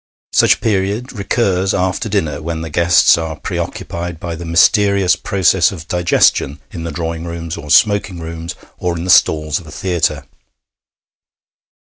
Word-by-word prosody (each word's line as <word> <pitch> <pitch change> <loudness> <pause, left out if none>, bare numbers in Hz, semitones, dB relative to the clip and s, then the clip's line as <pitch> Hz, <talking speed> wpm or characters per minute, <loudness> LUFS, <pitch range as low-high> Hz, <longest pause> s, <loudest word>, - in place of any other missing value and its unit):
Such - - +5
a - - -18
period 105 +4 -1
recurs 100 -3 0
after 95 +4 -1
dinner 80 -8 -1
when 80 0 -4
the 80 -1 -6
guests 85 +1 +4
are 80 -1 -4
preoccupied 85 +2 -5
by 85 0 -5
the 85 +1 -7
mysterious 100 +3 +3
processes 95 -3 +2
of 85 -3 -9
digestion 85 -5 +2
in 85 - -7
the 85 - -4
drawing 80 -1 -4
rooms 85 -1 -5
or 75 - -9
smoking 100 -1 +3
rooms 80 +1 -7 0.2
or 90 -1 -2
in 85 - -5
the 90 - +1
stalls 75 -3 +3
of 85 - -14
a - - -11
theatre. 80 -6 -1
85 Hz, 155 wpm, -16 LUFS, 80-95 Hz, 0.2 s, Such